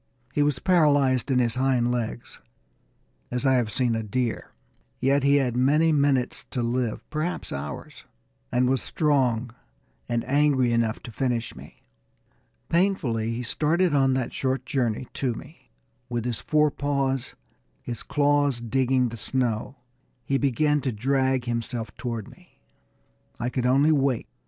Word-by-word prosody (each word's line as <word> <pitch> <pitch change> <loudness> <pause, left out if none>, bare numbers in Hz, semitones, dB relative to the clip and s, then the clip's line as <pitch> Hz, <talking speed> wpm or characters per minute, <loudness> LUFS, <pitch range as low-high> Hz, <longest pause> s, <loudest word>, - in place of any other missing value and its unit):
He 145 - +1
was 145 -2 +2
paralyzed 145 -6 +3
in 130 - +2
his 120 -3 +2
hind 125 -2 +2
legs, 120 -1 -4 0.9
as 125 +2 -3
I 135 - +4
have 120 -4 +1
seen 125 -1 +1
a 115 - -1
deer, 115 +2 -2 0.5
yet 135 +2 +2
he 140 +1 +4
had 130 -4 +1
many 150 +6 +3
minutes 140 -4 +1
to 125 - -3
live, 120 -1 -2
perhaps 155 +3 -3
hours, 70 +1 -7 0.5
and 125 +1 +2
was 130 -1 +1
strong 130 -6 +1 0.6
and 120 -1 -1
angry 135 -3 +3
enough 115 -1 0
to 120 - -8
finish 120 0 -2
me. - - -14 0.8
Painfully 155 - +1
he 115 +2 -3
started 155 +7 +1
on 135 -2 +3
that 130 -2 -2
short 130 0 -1
journey 125 -2 -1
to 125 -4 -1
me. 150 +8 -13 0.4
With 120 -1 -2
his 120 -2 -2
forepaws, 140 -3 0 0.5
his 120 - -5
claws 145 -3 +1
digging 125 +1 +1
the 115 - -7
snow, 120 +1 -1 0.5
he 135 0 +1
began 145 +2 +2
to 135 - -1
drag 130 +2 0
himself 115 -1 -3
toward 115 -4 -4
me. - - -18 0.8
I 120 +1 -1
could 125 -1 0
only 140 +5 +4
wait. 135 -5 +1
130 Hz, 145 wpm, -25 LUFS, 120-140 Hz, 0.9 s, I